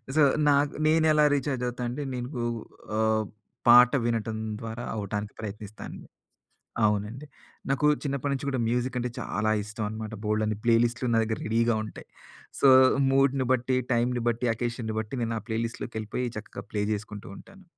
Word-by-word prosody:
So, 155 - +6 0.3
నాకు 145 0 +2 0.2
నేనేలా 155 -1 +4
recharge 130 -2 -2
అవుతానంటే 125 +3 -4
నేను 125 0 -4
గూ 120 - -1 0.5
ఆహ్, 110 0 +2 0.4
పాట 125 +1 +9 0.2
వినటం 110 -1 -1 0.2
ద్వారా 115 +2 -5
అవ్వటానికి 105 0 -4
ప్రయత్నిస్తాను. 105 0 -7 0.9
అవునండి. 105 +6 -1 0.4
నాకు 135 +1 +1 0.2
చిన్నప్పటి 140 -1 -2
నుంచి 140 0 -3
గూడా 130 -2 -1
మ్యూజిక్ 125 +2 -1
అంటే 125 0 -2
చాలా 110 +1 -1
ఇష్టం 110 +1 -5
అనమాట. 110 0 -6
బోలెడన్ని 105 0 0
ప్లే 115 -1 +4
లిస్టులు 120 +1 -1
నా 115 - +4
దగ్గర 110 0 -2
రెడీగా 115 +1 +2
ఉంటాయి. 110 - -10 0.5
సో 140 - +6 0.4
మూడ్‌ని 135 -1 +3
బట్టి, 130 +1 +1 0.2
టైమ్‌ని 120 0 +1
బట్టి, 120 +1 -1
అకేషన్‌ని 115 -1 -3
బట్టి 110 +4 -5
నేను 115 0 -2
ఆ - - -11
ప్లే 110 - -1
లిస్ట్‌‌లోకెళ్ళిపోయి 115 +1 -4
చక్కగా 110 - -8
ప్లే 105 -1 -1
జేసుకుంటూ 105 -1 -6
ఉంటాను. 195 -1 -15
120 Hz, 150 wpm, -27 LUFS, 110-130 Hz, 0.9 s, పాట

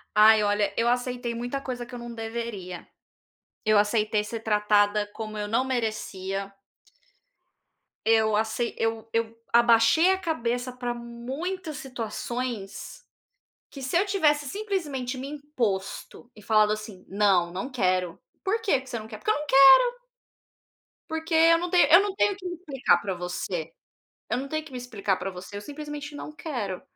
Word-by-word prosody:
Ai, 215 0 +7
olha, 205 -1 +1
eu 230 - +2
aceitei 245 -1 -1
muita 245 +4 -3
coisa 245 -2 -5
que 250 - -15
eu 245 - -6
não 235 0 -7
deveria, 225 -6 -6 0.8
eu 215 -1 +5
aceitei 210 0 +2
ser 225 +1 -6
tratada 210 -1 +2
como 215 -1 -6
eu 210 - -3
não 230 +5 +1
merecia 200 -5 -3 1.5
eu 220 -1 +4
acei 220 +2 -1
eu 225 0 -1
eu 230 0 -1 0.2
abaixei 235 +9 +5
a 380 - +2
cabeça 245 -7 -2
para 245 -1 -3
muitas 275 +9 -5
situações 240 - -5 0.6
que 275 - -10
se 265 +6 0
eu 390 - +3
tivesse, 300 -7 +2
simplesmente, 290 -9 -3
me 265 +2 -5
imposto 245 -7 -4
e 210 - -14
falado 215 0 +3
assim: 215 -3 -6
"Não, 195 -4 +2
não 190 +8 -4
quero! 185 -6 0 0.2
'Por 430 +4 0
que 280 -10 +2
que 260 - -14
você 235 - -3
não 215 - -9
quer?' 220 -1 -8
Porque 430 - 0
eu - - +2
não 300 - -6
quero" 285 - +7 1.1
"porque 320 +1 -4
eu 330 +1 +6
não 350 +1 -3
tenho 350 -4 +5
eu 340 +4 +9
não 405 -1 -2
tenho 405 0 +2
que 380 -1 -13
me 355 -1 -3
explicar 290 -7 +1
pra 195 -2 -3
você, 175 -2 -4 0.6
eu 245 - 0
não 270 - -4
tenho 310 +2 -3
que 285 - -13
me 250 - -6
explicar 210 -6 -1
pra 195 - -4
você, 185 +2 -9
eu, 205 - -6
simplesmente, 295 +2 -7
não 300 - -7
quero, 240 - -4
235 Hz, 165 wpm, -26 LUFS, 210-290 Hz, 1.5 s, eu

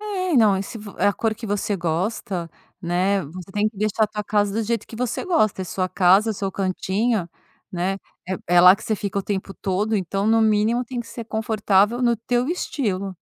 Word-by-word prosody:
É 375 -5 -2
não, 205 -4 +4
se 225 - -8
vo 205 -1 -10
é - - +3
a 205 - +4
cor 220 +1 -1
que 225 0 -8
você 205 0 -1
gosta, 175 +1 -2 0.3
né, 185 +3 +1
você 180 +5 -10
tem 210 +1 +1
que 215 - -19
deixar 215 +1 +1
a - - -1
tua 210 0 -5
casa 205 -1 +1
do 225 - 0
jeito 230 0 -2
que 225 - -10
você 250 - -2
gosta, 215 - +1
é - - -4
sua 185 +1 -2
casa, 190 +4 +4
é - - 0
seu 195 -1 -3
cantinho, 190 +1 -1 0.4
né. 180 +2 -1 0.3
É 190 0 -2 0.2
é - - +9
lá 180 +1 +9
que - - -13
você 225 - 0
fica 200 0 -3
o - - -2
tempo 195 -1 -3
todo. 200 +3 -1
então, 195 +2 -1
no 225 0 +4
mínimo 220 +3 +2
tem 245 0 -4
que 235 - -9
ser 230 0 -7
confortável 220 0 +1
no 235 -1 +3
teu 245 +4 -1
estilo. 200 - -2
205 Hz, 220 wpm, -22 LUFS, 190-225 Hz, 0.4 s, é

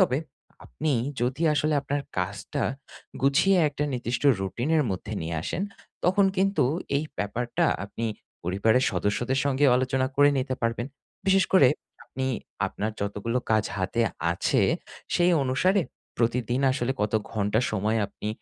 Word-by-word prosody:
তবে, 145 -8 +3 0.5
আপনি 155 -1 -2 0.3
যদি 130 +7 -1
আসলে 150 +1 +1
আপনার 140 +1 -2 0.2
কাজটা 100 +3 -3 0.6
গুছিয়ে 180 +8 +4
একটা 145 +1 -3
নির্দিষ্ট 120 +1 -2 0.2
routine 120 - -2
এর 150 - +3
মধ্যে 95 +3 -4
নিয়ে 80 0 -3
আসেন 180 - -2 0.4
তখন 190 +3 +4
কিন্তু 190 -7 +2 0.3
এই 150 - 0
ব্যাপারটা 120 +4 -1 0.2
আপনি 115 +3 -4 0.4
পরিবারের 110 +8 +2
সদস্যদের 105 +8 0
সঙ্গেও 140 -1 +3
আলোচনা 130 0 +1
করে 145 0 +6
নিতে 130 0 -1
পারবেন। 115 +1 0 0.4
বিশেষ 195 0 +5
করে 140 -9 +7 0.4
আপনি 130 0 -4 0.4
আপনার 110 +2 -3
যতগুলো 105 +4 -1
কাজ 110 -1 +3
হাতে 95 +5 -1 0.3
আছে 85 - +1 0.5
সেই 175 +1 +4
অনুসারে 185 +10 +2 0.4
প্রতিদিন 120 +2 +1
আসলে 130 0 -1
কত 105 0 0 0.2
ঘন্টা 105 +1 +1
সময় 110 +2 0
আপনি 105 - -7
125 Hz, 135 wpm, -26 LUFS, 110-145 Hz, 0.6 s, করে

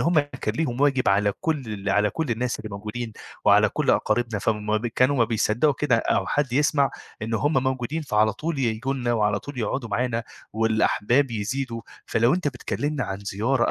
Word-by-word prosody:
هم 170 -1 +3
كان 130 -6 -4
ليهم 135 -5 -1
واجب 140 -3 +3
على 100 +1 +3
كل 160 -5 -1
ال 100 0 -5
على 105 +1 +3
كل 160 -5 -3
الناس 115 +1 -1
اللي 110 - -7
موجودين 110 +3 -5 0.3
وعلى - - +6
كل - - 0
أقاربنا 115 -3 +1
فم 105 +2 0
كانوا 130 +4 +2
ما 120 - +4
بيصدّقوا 115 +5 +2
كده 145 -5 +3
أو 115 - +1
حد 145 -4 0
يسمع 140 0 +3 0.3
إنه 110 +1 -1
هم 145 -3 +2
موجودين، 130 +4 -2
فعلى 110 -6 +2
طول 160 +2 -3
ييجوا 125 +2 -1
لنا 120 -2 -1
وعلى 105 -3 +1
طول 145 +1 -9
يقعدوا 115 +2 -2
معانا 115 +2 -1 0.3
والأحباب 110 +4 +2
يزيدوا، 115 +2 -3 0.2
فلو 120 +5 +3
أنت 175 -4 0
بتكلّمنا 145 +2 -3
عن 95 -1 -4
زيارة 110 +6 0
120 Hz, 180 wpm, -24 LUFS, 110-140 Hz, 0.3 s, وعلى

